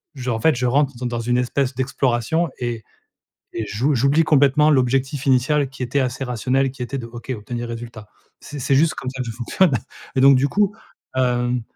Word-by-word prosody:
je 130 -2 -4
en 115 - -1
fait, 155 +6 +3
je 125 +1 -1
rentre 140 +2 +2
dans 125 - -5
dans 120 -1 -2
une 120 +1 0
espèce 125 +1 -1
d'exploration 130 +4 0
et 120 -2 -3 0.7
et 110 - -3
j'ou 125 +9 0
j'oublie 140 +6 +3
complètement 150 0 +4
l'objectif 135 0 +1
initial 135 +2 +2
qui 135 -1 -8
était 125 +3 0
assez 130 0 -2
rationnel, 130 +2 0
qui 130 -1 -9
était 135 +3 -4
de: 115 - -6
«OK, 120 +2 -10
obtenir 120 +3 -5
résultat». 115 -2 -8 0.3
C'est 145 - -9
c'est 135 +2 +1
juste 155 +4 +3
comme 130 - -5
ça 130 0 -4
que 120 - -5
fonctionne 135 - +1 0.4
et - - +3
donc 135 0 +7
du 135 +2 +2
coup, 205 +4 +1 0.4
hem 125 -1 +1
130 Hz, 200 wpm, -21 LUFS, 120-140 Hz, 0.7 s, donc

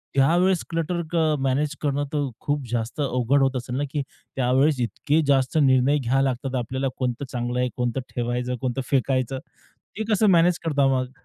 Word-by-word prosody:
त्यावेळेस 175 +6 +3
क्लटर 170 +1 -1 0.2
अ, 155 -2 +3
मॅनेज 140 +3 0
करणं 145 -1 0
तर 145 -2 0
खूप 145 -1 -1
जास्त 120 +5 -2
अवघड 135 +1 +1
होत 135 -1 +2
असेल 125 0 -5
ना, 145 - 0
की 145 - -1 0.3
त्यावेळेस 130 +2 +2
इतके 150 +9 0
जास्त 135 +2 +2
निर्णय 130 +3 +4
घ्यावे 135 +2 +1
लागतात 130 0 -2
आपल्याला 130 +3 -2
कोणतं 125 +1 -2
चांगलं 120 0 -2
आहे, 125 0 +1
कोणतं 125 +1 -1 0.2
ठेवायचं, 125 +1 -1
कोणतं 130 0 -1
फेकायचं. 130 -1 +1 0.6
ते 220 - -1
कसं 210 +1 +3
मॅनेज 175 0 +4
करता 145 -3 +2
मग? 130 0 -3
135 Hz, 170 wpm, -24 LUFS, 125-150 Hz, 0.6 s, निर्णय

